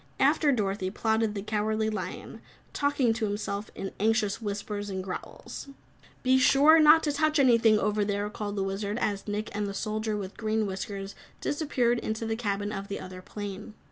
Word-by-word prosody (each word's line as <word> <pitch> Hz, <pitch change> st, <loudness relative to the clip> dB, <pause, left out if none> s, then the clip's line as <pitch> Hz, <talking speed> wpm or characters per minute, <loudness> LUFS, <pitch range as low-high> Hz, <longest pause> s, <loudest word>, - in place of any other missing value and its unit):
After 295 Hz, -2 st, +4 dB
Dorothy 195 Hz, -5 st, 0 dB
plodded 220 Hz, +1 st, 0 dB
the 200 Hz, -, -3 dB
Cowardly 215 Hz, +1 st, 0 dB
Lion, 185 Hz, -4 st, -6 dB, 0.3 s
talking 285 Hz, -5 st, +2 dB
to 225 Hz, 0 st, -1 dB
himself 205 Hz, 0 st, -3 dB
in 195 Hz, -, -5 dB
anxious 215 Hz, 0 st, +1 dB
whispers 205 Hz, 0 st, -4 dB
and 190 Hz, -1 st, -3 dB
growls. 185 Hz, +8 st, -7 dB, 0.6 s
"Be 260 Hz, +1 st, +4 dB
sure 290 Hz, +5 st, +6 dB
not 310 Hz, +1 st, +7 dB
to 295 Hz, -, +1 dB
touch 310 Hz, +2 st, +1 dB
anything 230 Hz, -5 st, +5 dB
over 210 Hz, 0 st, +1 dB
there," 205 Hz, 0 st, -1 dB
called 205 Hz, -1 st, -4 dB
the 195 Hz, -, 0 dB
Wizard, 200 Hz, +2 st, -2 dB
as 205 Hz, -4 st, -2 dB
Nick 210 Hz, 0 st, -3 dB
and 205 Hz, 0 st, -1 dB
the 200 Hz, -, -5 dB
Soldier 215 Hz, 0 st, -2 dB
with 195 Hz, -1 st, -6 dB
Green 220 Hz, 0 st, 0 dB
Whiskers 195 Hz, 0 st, -5 dB, 0.3 s
disappeared 250 Hz, -6 st, 0 dB
into 220 Hz, 0 st, -3 dB
the 225 Hz, 0 st, -1 dB
cabin 205 Hz, -2 st, -2 dB
of 200 Hz, -1 st, -5 dB
the 200 Hz, -, -4 dB
other 185 Hz, 0 st, -8 dB
plane. 205 Hz, +2 st, -7 dB
210 Hz, 175 wpm, -28 LUFS, 200-225 Hz, 0.6 s, not